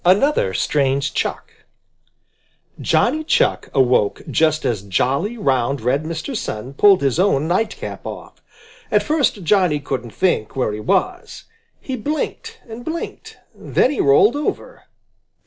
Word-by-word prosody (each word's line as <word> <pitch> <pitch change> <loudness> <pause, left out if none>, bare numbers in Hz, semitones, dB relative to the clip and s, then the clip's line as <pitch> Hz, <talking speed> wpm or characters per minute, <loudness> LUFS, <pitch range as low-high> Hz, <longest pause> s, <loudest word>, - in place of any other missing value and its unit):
ANOTHER 185 - +3
STRANGE 140 0 0
CHUCK - - -3 1.3
Johnny 310 0 +1
Chuck - - +1
awoke 125 -6 +2
just 155 -1 +2
as 110 -5 0
jolly, 135 - -1
round, 135 - 0
red 130 +6 0
Mr. 165 - -4
Sun 125 - -5
pulled 195 +4 +5
his 135 +3 +1
own 160 -6 +2
nightcap 210 +6 -2
off. - - -9 0.5
At - - +2
first 285 - 0
Johnny 180 -4 +2
couldn't 130 -4 -4
think 140 - -1
where 125 -5 0
he 105 - -5
was. 360 - -1 0.4
He 265 - -5
blinked 310 - -4
and 230 +1 -9
blinked. 325 +5 -6 0.2
Then 260 - +1
he 295 - -1
rolled 420 -2 +5
over. - - -4
165 Hz, 130 wpm, -20 LUFS, -, 1.3 s, pulled